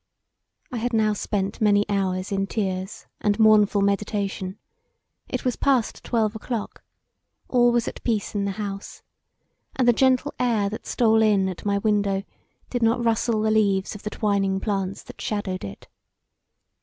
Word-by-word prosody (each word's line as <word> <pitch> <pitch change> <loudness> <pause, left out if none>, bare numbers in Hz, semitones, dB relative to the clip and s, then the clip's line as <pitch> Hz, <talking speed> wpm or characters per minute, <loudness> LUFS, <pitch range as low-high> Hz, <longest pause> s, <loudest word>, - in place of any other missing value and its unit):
I 250 - -3
had 240 +2 -2
now 215 -1 +3
spent 200 -1 -3
many 205 -1 +3
hours 190 -1 -1
in 195 0 0
tears 190 -2 -3
and 205 0 +1
mournful 215 -2 +5
meditation; 200 -1 -1 0.7
it - - -3
was 250 - +1
past 265 -5 +1
twelve 220 -2 0
o'clock; 220 0 -5 0.7
all 245 -1 +4
was 240 -1 +1
at - - -6
peace 220 -4 -1
in 200 -1 -1
the 200 - -2
house, 200 -2 -6 0.7
and 255 -2 +1
the 240 - +7
gentle 260 +3 +2
air 225 -5 +1
that 215 - -7
stole 225 -2 +3
in 205 -3 +3
at 185 - -8
my 200 -1 +1
window 200 -2 +1 0.5
did 245 - -1
not 230 +1 +2
rustle 225 -1 +1
the 220 - +2
leaves 200 -3 +2
of 210 - -9
the 210 - -4
twining 200 -2 0
plants 195 -2 -2
that - - -12
shadowed 205 -3 -3
it. 100 - -9
210 Hz, 160 wpm, -24 LUFS, 195-225 Hz, 0.7 s, the